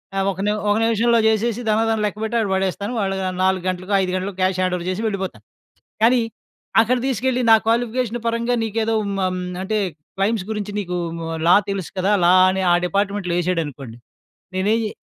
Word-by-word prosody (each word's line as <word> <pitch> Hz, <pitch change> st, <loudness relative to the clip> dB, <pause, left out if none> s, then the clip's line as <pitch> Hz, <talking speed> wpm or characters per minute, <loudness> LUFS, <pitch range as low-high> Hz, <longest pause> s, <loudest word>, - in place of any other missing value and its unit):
ఆహ్, 195 Hz, 0 st, +1 dB
ఒక 185 Hz, -, -9 dB
నిమ 210 Hz, -, +1 dB
ఒక 205 Hz, -, +3 dB
నిమిషంలో 230 Hz, +1 st, +3 dB
జేసేసి 220 Hz, +2 st, +1 dB
ధనాధన 220 Hz, 0 st, +2 dB
లెక్కబెట్టి 220 Hz, +3 st, -3 dB
అక్కడ 210 Hz, -4 st, -1 dB
పడేస్తాను. 195 Hz, +3 st, -2 dB
వాళ్ళు 195 Hz, -1 st, -1 dB, 0.3 s
4 190 Hz, -1 st, +1 dB
గంటలకో, 185 Hz, +2 st, -4 dB
5 185 Hz, -, -2 dB
గంటలకో 185 Hz, +1 st, -4 dB
క్యాష్ 185 Hz, 0 st, +1 dB
హ్యాండోవర్ 180 Hz, -1 st, -1 dB
జేసి 185 Hz, +4 st, -2 dB
వెళ్ళిపోతాను. 195 Hz, -3 st, -4 dB, 0.6 s
కానీ, 240 Hz, +2 st, +5 dB, 0.6 s
అక్కడ 245 Hz, +3 st, +1 dB
తీసుకెళ్ళి, 255 Hz, 0 st, 0 dB
నా 225 Hz, -, +9 dB
క్వాలిఫికేషన్ 240 Hz, 0 st, 0 dB
పరంగా 235 Hz, +1 st, 0 dB
నీకేదో 225 Hz, +1 st, -1 dB
హ్మ్. 200 Hz, -, -3 dB
హ్మ్. 185 Hz, 0 st, -3 dB, 0.2 s
అంటే 215 Hz, +3 st, -1 dB, 0.4 s
క్లైమ్స్ 195 Hz, 0 st, 0 dB
గురించి 210 Hz, -1 st, -3 dB
నీకు 180 Hz, -2 st, -4 dB, 0.5 s
లా 175 Hz, -, +7 dB, 0.2 s
డెలుసు 195 Hz, -4 st, -4 dB
కదా! 195 Hz, +3 st, +2 dB
లా 180 Hz, -, +6 dB, 0.2 s
అని 190 Hz, 0 st, -1 dB
ఆ -, -, +5 dB
డిపార్ట్‌మెంట్‌లో 200 Hz, -2 st, -1 dB
ఏశాడనుకోండి. 145 Hz, -9 st, -3 dB, 0.6 s
నేనేం 205 Hz, +5 st, +1 dB
చే 215 Hz, -, -3 dB
205 Hz, 165 wpm, -21 LUFS, 185-225 Hz, 0.6 s, నా